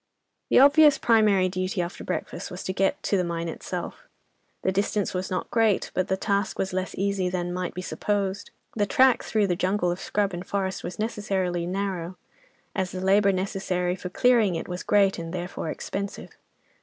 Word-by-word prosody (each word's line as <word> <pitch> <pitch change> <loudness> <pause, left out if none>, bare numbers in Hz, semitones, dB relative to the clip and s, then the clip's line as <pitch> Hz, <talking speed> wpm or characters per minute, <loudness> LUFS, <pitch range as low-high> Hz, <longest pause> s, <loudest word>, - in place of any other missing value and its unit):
The - - +4
obvious 290 +2 +7
primary 210 -5 +4
duty 185 +1 -2
after 175 +1 -3
breakfast 180 - -4
was 180 - -7
to 185 - -3
get 195 +1 0
to 200 - +1
the 180 - +1
mine 170 -1 -3
itself. 335 - -6 0.6
The 190 - +2
distance 200 +1 0
was 185 0 -3
not 185 - -3
great, 225 -4 +2
but 185 - 0
the 190 - 0
task 200 0 -1
was 190 -1 -2
less 185 0 -2
easy 195 -1 0
than 175 -1 -2
might 180 0 -3
be 180 - -4
supposed. 200 0 -2 0.3
The 205 -2 +1
track 260 +3 +4
through 215 -2 +1
the 180 -2 0
jungle 185 -1 +1
of 175 - -4
scrub 200 -2 -1
and 175 +1 -4
forest 190 0 -2
was 175 - -6
necessarily 195 -5 -1
narrow, 185 -2 -3 0.6
as 190 -1 -1
the 185 - -6
labour 200 +2 +4
necessary 185 -1 -1
for 180 -1 -6
clearing 225 -2 +3
it 165 - -4
was 180 0 -4
great 195 -3 +3
and, 165 0 -6
therefore, 175 -2 -4
expensive. 200 +5 -5
190 Hz, 185 wpm, -26 LUFS, 180-200 Hz, 0.6 s, obvious